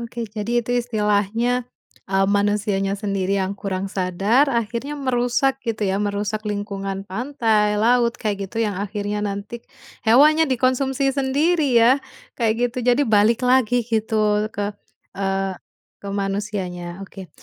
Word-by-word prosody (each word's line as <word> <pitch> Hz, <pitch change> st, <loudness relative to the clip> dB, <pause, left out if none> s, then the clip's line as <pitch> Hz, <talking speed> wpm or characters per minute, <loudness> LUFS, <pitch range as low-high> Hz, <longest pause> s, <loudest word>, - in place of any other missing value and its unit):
Oke, 235 Hz, 0 st, -5 dB
jadi 225 Hz, +2 st, -2 dB
itu 245 Hz, -, -2 dB
istilahnya, 230 Hz, +2 st, 0 dB, 0.4 s
mmm, 195 Hz, 0 st, +2 dB
manusianya 205 Hz, -1 st, +1 dB
sendiri 200 Hz, -1 st, -1 dB
yang 190 Hz, 0 st, -1 dB
kurang 195 Hz, -1 st, -4 dB
sadar 195 Hz, +9 st, +2 dB
akhirnya 235 Hz, +4 st, -2 dB
merusak 260 Hz, 0 st, 0 dB
gitu 225 Hz, -4 st, -2 dB
ya 195 Hz, +1 st, 0 dB
merusak 205 Hz, +1 st, -2 dB
lingkungan 195 Hz, -1 st, -4 dB
pantai, 215 Hz, -1 st, 0 dB
laut, 235 Hz, +2 st, +3 dB
kayak 200 Hz, -3 st, -3 dB
gitu 225 Hz, +1 st, -1 dB
yang 205 Hz, -3 st, -2 dB
akhirnya 205 Hz, 0 st, -3 dB
nanti, 205 Hz, +3 st, -4 dB, 0.5 s
hewannya 300 Hz, +6 st, +5 dB
dikonsumsi 265 Hz, +2 st, +1 dB
sendiri 280 Hz, +1 st, +1 dB
ya, 230 Hz, +2 st, +7 dB, 0.5 s
kayak 235 Hz, +1 st, +1 dB
gitu 250 Hz, -, -5 dB
jadi 245 Hz, +4 st, +4 dB
balik 220 Hz, +2 st, +3 dB
lagi 245 Hz, -1 st, +3 dB
gitu 215 Hz, -2 st, +1 dB
ke 205 Hz, -1 st, -3 dB, 0.4 s
eee, 195 Hz, 0 st, -1 dB, 0.5 s
ke 200 Hz, -, -8 dB
manusianya, 195 Hz, -3 st, -4 dB
oke. 190 Hz, -2 st, -11 dB
215 Hz, 130 wpm, -22 LUFS, 200-245 Hz, 0.5 s, ya